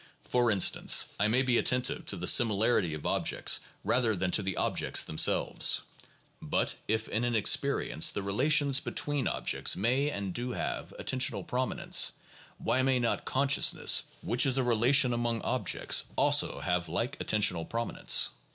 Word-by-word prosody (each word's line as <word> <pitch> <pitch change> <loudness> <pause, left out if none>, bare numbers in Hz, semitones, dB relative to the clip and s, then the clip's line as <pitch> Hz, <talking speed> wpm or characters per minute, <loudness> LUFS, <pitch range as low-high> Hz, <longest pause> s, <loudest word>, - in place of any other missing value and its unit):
For 120 -1 0
instance 100 -4 +3
I 105 - +2
may 125 +4 +2
be 125 -2 +1
attentive 125 +3 -1
to 95 - -4
the 90 - -6
similarity 105 -6 +2
of 75 - -10
objects - - 0 0.2
rather 120 -4 0
than 90 0 -3
to 105 - +1
the 95 -2 -4
objects - - 0
themselves. 80 - +2 0.6
But - - -1
if 110 +1 -2
in 115 - -2
an 120 -1 -2
experience 110 - +2
the 100 - -5
re 100 0 -3
lations 140 +2 +2
between 145 -2 -3
objects - - 0
may 130 +8 0
and 100 -8 -5
do 125 +3 -5
have - - -5
attentional 130 0 -2
prominence, 130 +1 0 0.4
why 120 +3 -1
may 130 0 +1
not 120 -2 -2
consciousness, 135 +1 +2 0.2
which 125 +3 0
is 135 0 +3
a 130 - +1
relation 125 +2 +3
among 120 -1 -3
objects, - - 0
also - - +2
have 90 +2 -3
like 115 - -4
attentional 100 -6 -1
prominence? 115 0 +1
120 Hz, 155 wpm, -28 LUFS, 100-130 Hz, 0.6 s, instance